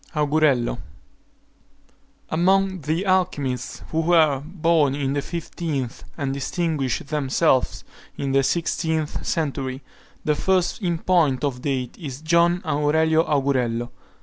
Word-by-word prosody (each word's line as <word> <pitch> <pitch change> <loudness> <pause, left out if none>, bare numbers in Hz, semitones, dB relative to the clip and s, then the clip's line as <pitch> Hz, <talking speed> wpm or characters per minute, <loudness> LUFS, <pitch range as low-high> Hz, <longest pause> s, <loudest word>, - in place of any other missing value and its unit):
AUGURELLO. 150 - +2 1.5
Among 190 +2 +2
the 160 +6 -1
alchymists 175 -9 -1
who 160 - +1
were 160 -4 +4
born 160 -4 +1
in 140 -1 -1
the 145 - 0
fifteenth, 155 -6 -4
and 140 -3 -2
distinguished 140 -2 -2
themselves 145 -2 +1 0.3
in 140 -1 -2
the 135 0 +4
sixteenth 160 +1 -1
century, 140 -4 -2 0.4
the 150 - +3
first 185 +6 0
in 175 -3 0
point 160 -7 +2
of 130 -4 -2
date 130 -3 -2
is 140 -4 -7
John 170 +2 +3
Aurelio 160 +2 +2
Augurello. 125 -5 0
150 Hz, 115 wpm, -23 LUFS, 135-170 Hz, 1.5 s, were